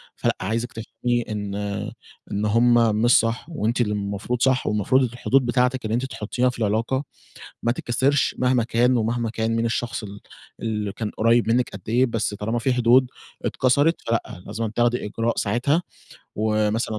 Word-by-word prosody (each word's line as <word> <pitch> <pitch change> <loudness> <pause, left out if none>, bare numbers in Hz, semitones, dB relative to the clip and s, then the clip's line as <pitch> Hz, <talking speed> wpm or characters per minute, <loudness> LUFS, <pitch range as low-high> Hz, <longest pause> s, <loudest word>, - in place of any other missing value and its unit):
فلأ، - - 0
عايزِك 115 +4 -2
تفهمي 115 +2 -2
إن 105 -2 -4 0.8
إن 100 +1 -1
هم 115 0 +4
مش 120 +1 +6
صح 115 +3 -1
وأنتِ 120 -6 -1
اللي 105 -2 0
المفروض 105 +4 -3
صح، 130 0 +2
والمفروض 105 +5 +2
الحدود 125 +2 +1
بتاعتِك 125 0 +1
اللي 110 - -2
أنتِ 125 +3 0
تحُطّيها 125 +1 -1
في 125 - -7
العلاقة 115 +5 0 0.6
ما 120 - +2
تتكسِرش 130 +3 +1
مهما 125 -1 +2
كان، 120 +2 +2
ومهما 115 0 -1
كان 115 0 -1
مين 115 - 0
الشخص 115 0 -2
اللي 100 0 -8 0.4
اللي 105 -3 -2
كان 110 -3 -4
قُريّب 115 +1 +3
منِّك 125 +2 +2
قد 95 - -9
إيه، 125 +3 +4
بس 115 -3 -2
طالما 110 +3 -2
في 130 +2 +1
حدود 125 +1 +4 0.4
اتكسرت 145 +6 +2
فلأ، 115 -6 -2
لازم 110 +2 -3
تاخدي 120 +2 0
إجراء 115 +2 -2
ساعتها، 125 - +1 0.6
ومثلًا 110 0 0
115 Hz, 165 wpm, -23 LUFS, 110-125 Hz, 0.8 s, مش